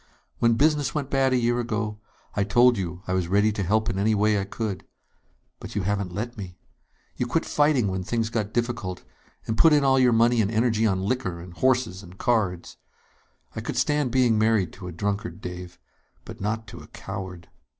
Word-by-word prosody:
When 115 -1 +4
business 145 -2 +2
went 140 -3 -3
bad 135 -1 +2
a 130 - +3
year 120 0 +1
ago, 110 -2 -2 0.4
I 100 - +2
told 120 +5 +5
you 90 -2 -5
I 95 - -2
was 95 -2 0
ready 105 +4 +3
to 105 - -3
help 110 +4 +1
in 95 - -1
any 110 +2 +2
way 105 0 +2
I - - -3
could. 100 -1 -4 0.8
But - - -9
you 105 - 0
haven't 100 -1 -1
let 110 +5 -5
me. 90 -3 -8 0.6
You 125 - -1
quit 160 +7 0
fighting 145 -7 +2
when 95 -1 -2
things 115 +2 -1
got 110 -3 -2
difficult, 115 -6 -2 0.4
and 110 0 -3
put 165 -2 +7
in 145 -1 +4
all 135 -1 +4
your 125 -1 +5
money 115 +1 +4
and 100 - 0
energy 115 0 +2
on 95 -2 0
liquor 100 -6 -2
and 85 +1 -10
horses 125 -3 +1
and 95 -1 -14
cards. 100 -8 -1 0.8
I 110 - -3
could 115 - -4
stand 145 +1 +1
being 120 -3 +3
married 110 -6 +2
to 90 -1 -9
a - - -5
drunkard, 100 +4 -3
Dave, 90 -2 -8 0.5
but - - -10
not 110 +2 -2
to 85 - -10
a 75 - -13
coward 90 -2 -8
110 Hz, 200 wpm, -25 LUFS, 95-120 Hz, 0.8 s, put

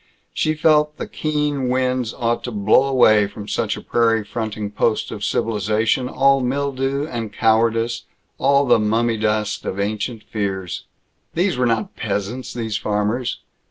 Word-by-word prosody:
She 155 0 0
felt 150 -1 +3
that - - -4
the - - -21
keen 150 -4 -1
winds 125 -2 0
ought 120 -2 -1
to 125 - -4
blow 105 +5 +3
away 110 -6 +4
from 105 0 -9
such 115 -1 -1
a - - -7
prairie 115 -2 +2
fronting 110 -2 -4
post 110 +1 0
of - - -6
civilization 110 +4 0
all 135 +1 +3
mildew 135 +1 -1
and 115 -7 -5
cowardice, 115 +1 +1 0.3
all 140 +1 +4
the 120 -3 +4
mummy 115 +2 +1
dust 105 -1 -1
of 95 - -4
ancient 105 +2 -2
fears. 95 -4 -4 0.5
These 180 0 +1
were 125 0 +1
not 110 -2 -1
peasants, 105 +4 -3
these 110 -3 -3
farmers. 105 +5 -1
115 Hz, 155 wpm, -21 LUFS, 105-130 Hz, 0.5 s, away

